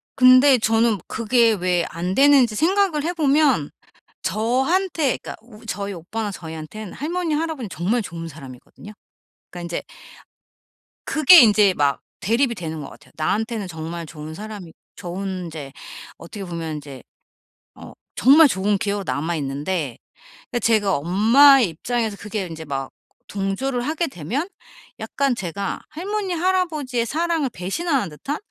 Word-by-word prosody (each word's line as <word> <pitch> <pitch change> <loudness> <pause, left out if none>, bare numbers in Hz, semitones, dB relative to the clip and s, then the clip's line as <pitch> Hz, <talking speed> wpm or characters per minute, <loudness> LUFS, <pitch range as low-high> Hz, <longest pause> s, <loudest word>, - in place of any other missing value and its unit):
근데 255 +1 +7
저는 225 -1 +2
그게 230 0 +2
왜 180 -3 0
안 180 +3 -3
되는지 270 -5 +5
생각을 355 - +2
해 345 +3 -1
보면 285 - +2 0.5
저한테 270 - 0
그러니까 - - -8
우 225 -2 -16
저희 200 -2 -4
오빠나 205 +5 -5
저희한테는 165 +4 -8
할머니, 335 +1 -2
할아버지는 305 -7 -3
정말 195 +9 -1
좋은 165 -4 -7
사람이거든요. 140 +7 -12 0.6
그러니까 175 - -8
인제 170 0 -4 1.2
그게 310 +3 +7
인제 210 -4 +5
막 145 -3 0 0.2
대립이 235 +5 +1
되는 160 -4 -5
것 - - -8
같아요. - - -17
나한테는 215 +5 -1
정말 165 0 -6
좋은 155 0 -9
사람이 205 -2 -9 0.2
좋은 185 0 -5
인제 155 -4 -8 0.5
어떻게 195 +4 -9
보면 165 -3 -5
인제 140 -4 -9 0.7
어 - - -12 0.2
정말 290 +5 +7
좋은 200 -3 0
기억으로 200 0 -2
남아 150 +7 -2
있는데 145 0 -3 0.6
예 240 - +1
제가 215 -5 +2
엄마의 225 - +5
입장에서 220 +5 -3
그게 210 -1 -4
인제 160 -1 -8
막 135 -2 -4 0.4
동조를 205 +6 -2
하게 315 +5 -1
되면 265 - -4 0.5
약간 275 -3 -1
제가 195 -1 -4
할머니, 385 +4 -3
할아버지의 320 -9 0
사랑을 320 0 -1
배신하는 230 - -2
듯한 275 - -5
215 Hz, 320 characters per minute, -22 LUFS, 170-275 Hz, 1.2 s, 근데